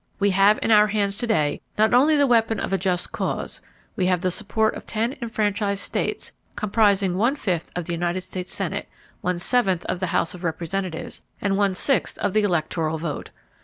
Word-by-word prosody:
"We 200 0 +3
have 195 +3 +5
in - - +1
our 210 -1 +7
hands 200 -1 0
to 240 - 0
day 155 -10 +1 0.2
not 215 +1 +3
only 285 +6 +5
the 285 - +5
weapon 225 -4 +2
of - - -3
a - - +3
just 180 -1 -1
cause; - - -3 0.3
we 185 - +1
have 180 -2 +2
the 185 -1 +1
support 215 +3 +1
of - - -8
ten 230 +5 -1
enfranchised 205 -3 0
states—states - - -2 0.2
comprising 200 -3 +2
one 235 +8 +2
fifth 180 - -2
of 175 -2 -3
the 170 - -3
United 175 +2 -1
States 185 0 -6
Senate, - - -3 0.3
one 180 -1 0
seventh 190 -2 +1
of 180 - -2
the 185 - -1
House 165 - 0
of 180 0 -10
Representatives, 170 +1 -3 0.2
and 200 -1 0
one 200 -1 +2
sixth 270 +8 0
of 190 - -1
the 215 - +4
electoral 160 -4 0
vote. 155 -1 -4
195 Hz, 200 wpm, -23 LUFS, 180-215 Hz, 0.3 s, our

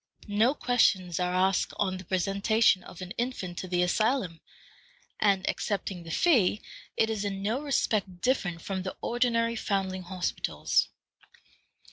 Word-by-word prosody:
No 220 +7 +2
questions 190 - +2
are 180 0 0
asked 185 +1 +1
on 190 -2 0
the 185 - -9
presentation 195 +2 +2
of 180 - -9
an 180 - -8
infant 215 -8 -3
to 185 - -5
the 180 0 +1
asylum, 200 -2 0 0.8
and, 195 -2 +2
excepting 195 -3 -2
the 165 - -10
fee, 215 - +3 0.4
it 220 0 +2
is 215 -2 -2
in 195 -1 -3
no 225 +7 0
respect 215 -10 0
different 180 -10 0
from 190 -1 -3
the 185 0 -6
ordinary 230 -1 +1
foundling 190 -3 -1
hospitals. 180 0 -1
195 Hz, 140 wpm, -28 LUFS, 185-225 Hz, 0.8 s, fee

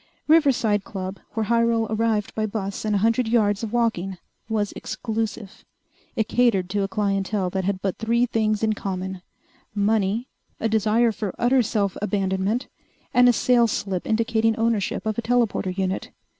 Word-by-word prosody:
Riverside 260 -10 +3
Club, 190 0 -6 0.2
where 225 - 0
Hyrel 230 0 +2
arrived 220 -1 0
by 215 0 -1
bus 200 -1 -4
and 210 -1 +1
a 200 +2 +2
hundred 230 +1 +2
yards 210 -3 +2
of 225 -2 -4
walking, 220 -6 0 0.3
was 210 -2 0
exclusive. 220 -2 -4 0.5
It 220 - 0
catered 200 -7 +2
to 205 0 0
a 195 - 0
clientele 195 -1 -1
that 190 -1 -2
had 190 -1 -2
but 195 -2 -2
three 235 +2 +2
things 215 -2 0
in 220 -1 +2
common: 190 -2 -4 0.5
money, 210 +3 +1 0.3
a 225 - 0
desire 220 +2 +2
for 210 -3 -4
utter 250 +2 +3
self 200 -4 -1
abandonment, 200 +3 0 0.5
and 245 0 +6
a - - +5
sales 235 -2 +3
slip 190 -3 -3
indicating 225 0 +1
ownership 225 -3 0
of 215 +1 -1
a - - 0
telporter 230 -6 0
suit. 190 0 -2
215 Hz, 160 wpm, -23 LUFS, 195-230 Hz, 0.5 s, and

